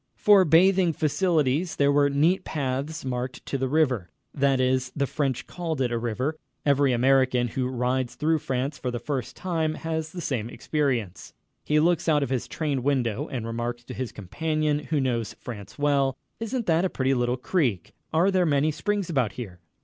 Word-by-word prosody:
For 200 -3 +6
bathing 180 +2 +4
facilities, 155 0 +1
there 140 0 +3
were 145 0 +4
neat 160 +7 +2
paths 140 +2 -3
marked 125 0 -4
to - - -4
the 135 -1 0
river. 130 - +1 0.2
That 135 -2 +2
is, 130 0 +1
the 140 - +1
French 135 -3 -2
called 165 -4 -4
it 125 -2 +1
a 120 - 0
river. 125 +7 -2 0.3
Every 140 -1 +3
American 125 0 +3
who 125 +2 -1
rides 125 0 -1
through 160 +1 +1
France 135 +2 -2
for 125 - -2
the 120 - -3
first 130 -1 -4
time 160 -4 -1
has 160 -1 -3
the 180 - -7
same 125 -9 -2
experience: 120 - -2 0.3
he 150 0 +2
looks 170 +1 +2
out 150 -2 +3
of 135 - -4
his 130 -3 -1
train 145 -5 -2
window 130 0 0
and 120 -4 -4
remarks 120 +1 -3
to - - -8
his 130 -2 -4
companion, 150 - -1
who 155 -2 0
knows 120 -4 -1
France 105 -6 -9
well: 140 -2 +1 0.2
"Isn't 230 +1 -2
that 165 +1 +2
a 190 - +1
pretty 135 -3 0
little 120 0 0
creek? 120 - -1 0.2
Are 170 +5 +3
there 185 -1 +3
many 145 +1 +2
springs 205 +4 -1
about 130 -10 0
here?" 95 -8 -8
140 Hz, 185 wpm, -26 LUFS, 125-160 Hz, 0.3 s, For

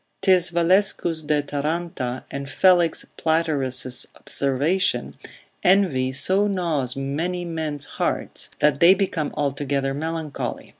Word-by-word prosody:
'Tis 185 -2 +5
Valescus 170 -2 +2
de 150 -1 +1
Taranta, 145 -3 -3
and 140 0 -5
Felix 175 +2 +3
Platerus' 140 -6 0
observation, 150 +8 0 0.5
Envy 175 -9 +3
so 190 +9 +1
gnaws 160 -10 -1
many 160 +7 -3
men's 155 -4 -3
hearts, - - -2
that 150 -1 +2
they 175 +4 +7
become 180 -6 -1
altogether 140 -1 -1
melancholy. 160 0 -4
155 Hz, 105 wpm, -23 LUFS, 140-175 Hz, 0.5 s, they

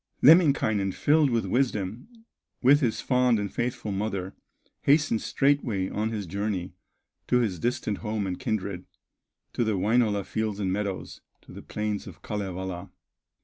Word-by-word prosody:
Lemminkainen, 135 - +5
filled 150 -1 +3
with 115 -2 0
wisdom, 115 - -1 0.6
With 140 +3 +6
his 120 -7 0
fond 125 -2 +3
and 100 -2 -3
faithful 120 -3 -2
mother, 95 -2 -3 0.5
Hastened 140 -6 +3
straightway 125 -9 +1
on 110 +1 -1
his 105 -3 -4
journey 95 0 -3 0.5
To 125 - +3
his 105 -8 0
distant 115 -2 -1
home 105 -2 -2
and 90 -1 -4
kindred, 100 -7 -3 0.7
To - - +1
the 110 -3 0
Wainola 105 -1 +2
fields 110 -2 -2
and 95 -2 0
meadows, 100 -2 -4 0.2
To - - -16
the - - -9
plains 105 -1 -3
of - - -12
Kalevala. 95 -3 -4
105 Hz, 145 wpm, -27 LUFS, 100-125 Hz, 0.7 s, With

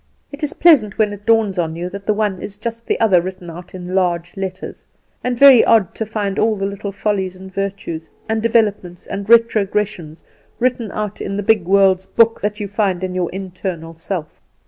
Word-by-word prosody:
It 285 +2 -9
is 300 - -1
pleasant 275 - +4
when 210 -2 +1
it 205 +1 -12
dawns 220 -5 +3
on 160 -2 -1
you 175 +2 -4
that 200 0 -9
the 215 - +3
one 205 -4 -1
is 200 0 -7
just 230 +1 -6
the - - 0
other 195 -6 +4
written 185 -1 -7
out 175 +2 -11
in 180 0 -7
large 175 -2 0
letters; 190 -1 -6 0.4
and 250 -1 -1
very 270 -2 +8
odd 215 -6 +3
to 220 - -4
find 205 -2 -2
all 220 0 +2
the 195 -1 -3
little 200 0 -4
follies 195 -2 -2
and 190 0 -12
virtues, 195 -5 -4 0.2
and 220 0 -1
developments 210 -6 0
and 200 +1 -6
retrogressions, 210 -7 +2 0.3
written 240 -4 -1
out 210 -1 -4
in 195 - -3
the 205 - -2
big 210 -3 +3
world's 190 0 +3
book 230 0 +3
that 210 +1 -2
you 205 - -3
find 195 -3 -1
in 185 -1 -3
your 180 -1 0
little 180 - -6
internal 175 -3 -6
self. 165 -1 -6
200 Hz, 205 wpm, -18 LUFS, 185-220 Hz, 0.4 s, very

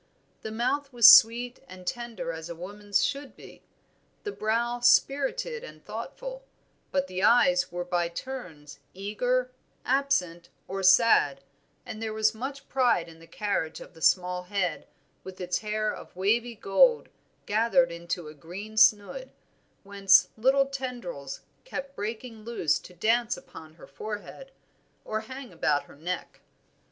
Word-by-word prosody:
The - - -5
mouth 255 +6 -1
was 235 -3 +10
sweet 240 +3 +5
and 185 -5 -12
tender 235 -4 -4
as 160 0 -7
a 170 - -6
woman's 205 +4 -1
should 280 -1 -4
be, - - -14 0.6
the 415 - -4
brow 235 - -1
spirited 285 - +2
and - - -12
thoughtful; - - -7 0.5
but 275 0 +1
the 185 -8 -5
eyes 270 +6 +4
were 175 0 -4
by 175 -1 0
turns 170 - -8 0.2
eager, 245 +6 -1 0.3
absent, 245 -11 0 0.2
or 195 +1 -4
sad, 180 -8 +5 0.4
and 215 - -7
there 220 -1 -3
was 220 0 +2
much 270 +5 -6
pride 245 -10 +2
in 165 0 -15
the 165 - -15
carriage 165 -3 -2
of - - -12
the 160 - -16
small 180 0 +2
head 180 -4 -2 0.4
with 190 -1 -10
its 180 -1 -1
hair 215 0 -1
of - - -12
wavy 230 +6 +1
gold 455 - +3 0.4
gathered 230 +4 +2
into 170 -1 -5
a 150 - -9
green 190 +9 -9
snood, 220 - +3 0.5
whence 200 -1 +4
little 265 +4 +3
tendrils 245 - -6 0.2
kept 280 - -7
breaking 225 +1 -6
loose 225 -9 0
to 180 - -14
dance 230 +5 +1
upon 160 0 -13
her - - -14
forehead, 215 - -8 0.5
or 215 - -2
hang 260 -1 -9
about 150 -3 +1
her - - -17
neck. 175 +4 -5
215 Hz, 145 wpm, -27 LUFS, 180-255 Hz, 0.6 s, was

